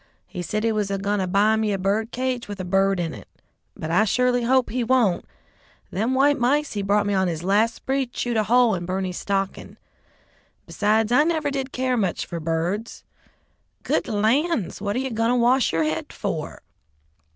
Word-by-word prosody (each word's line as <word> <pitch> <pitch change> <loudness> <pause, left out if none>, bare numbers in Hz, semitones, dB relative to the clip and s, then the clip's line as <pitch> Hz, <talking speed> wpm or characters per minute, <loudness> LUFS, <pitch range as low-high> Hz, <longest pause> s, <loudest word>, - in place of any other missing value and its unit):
He 180 - -7
said 215 +5 -2
he 230 - +2
was 210 -2 0
goin' 200 +1 -1
to 185 - -1
buy 205 +4 +3
me 220 -1 0
a - - 0
bird 200 +4 0
cage 255 -2 -2
with 205 -1 -7
a 185 - -4
bird 195 +1 +2
in 165 -2 -2
it, - - -11 0.5
but 155 - -4
I 180 +6 +4
surely 250 +3 +2
hope 260 +1 +2
he 250 +1 -1
won't. 230 -7 +2 0.7
Them 225 +7 0
white 285 +2 +3
mice 285 +5 +1
he 205 - -2
brought 205 +1 +1
me 205 - 0
on 190 -1 +2
his 165 -1 -3
last 215 +5 +2
spree 270 0 -2
chewed 240 0 -3
a 215 -1 +1
hole 240 0 +4
in 175 -2 -4
Berney's 185 -1 -3
stocking; 195 -1 -3 0.9
besides, 215 +2 +1
I 250 +5 +5
never 315 -3 0
did 270 -1 -3
care 255 -1 0
much 195 -5 -1
for 170 - -5
birds. 165 +7 -3 0.8
Good - - 0
lands! 230 - 0
what 205 0 -2
are - - 0
you 265 0 -3
goin' 225 +1 0
to 245 - +2
wash 245 +1 +3
yer 165 0 +1
head 155 +1 -3
for?" - - -5
215 Hz, 195 wpm, -23 LUFS, 195-250 Hz, 0.9 s, I